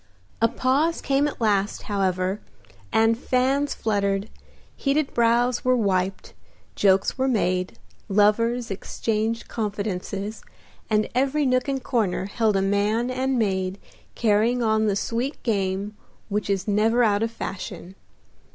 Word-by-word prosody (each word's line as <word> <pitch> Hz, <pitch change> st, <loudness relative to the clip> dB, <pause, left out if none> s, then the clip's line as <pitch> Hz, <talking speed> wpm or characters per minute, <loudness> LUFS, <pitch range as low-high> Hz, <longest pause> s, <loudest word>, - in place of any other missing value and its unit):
A 230 Hz, -, +6 dB
pause 265 Hz, +7 st, +1 dB
came 275 Hz, +1 st, +1 dB
at 295 Hz, -, -6 dB
last, 205 Hz, -3 st, +1 dB
however, 190 Hz, -1 st, -1 dB, 0.5 s
and 225 Hz, +1 st, +4 dB
fans 265 Hz, +4 st, 0 dB
fluttered, 200 Hz, -1 st, -1 dB, 0.4 s
heated 280 Hz, +1 st, 0 dB
brows 235 Hz, +1 st, +2 dB
were 255 Hz, 0 st, +3 dB
wiped, 195 Hz, -3 st, -1 dB, 0.4 s
jokes 195 Hz, +5 st, +2 dB
were 265 Hz, -, +2 dB
made, 185 Hz, -7 st, 0 dB, 0.3 s
lovers 225 Hz, +4 st, +2 dB
exchanged 220 Hz, +3 st, -2 dB
confidences, 205 Hz, -1 st, -4 dB, 0.5 s
and 215 Hz, -1 st, +2 dB
every 275 Hz, +4 st, +1 dB
nook 255 Hz, 0 st, +1 dB
and 270 Hz, -2 st, -2 dB
corner 215 Hz, -8 st, 0 dB
held 215 Hz, +1 st, 0 dB
a 195 Hz, -, +2 dB
man 210 Hz, +5 st, +1 dB
and 260 Hz, +1 st, 0 dB
maid 190 Hz, -3 st, 0 dB, 0.4 s
carrying 230 Hz, +2 st, +2 dB
on 220 Hz, -1 st, +2 dB
the 200 Hz, -, +1 dB
sweet 235 Hz, +7 st, -2 dB
game 200 Hz, -2 st, -1 dB, 0.3 s
which 205 Hz, 0 st, -2 dB
is 195 Hz, 0 st, -1 dB
never 220 Hz, +4 st, +3 dB
out 205 Hz, -2 st, +2 dB
of 225 Hz, -, +1 dB
fashion. 190 Hz, -3 st, -7 dB
220 Hz, 130 wpm, -24 LUFS, 200-245 Hz, 0.5 s, A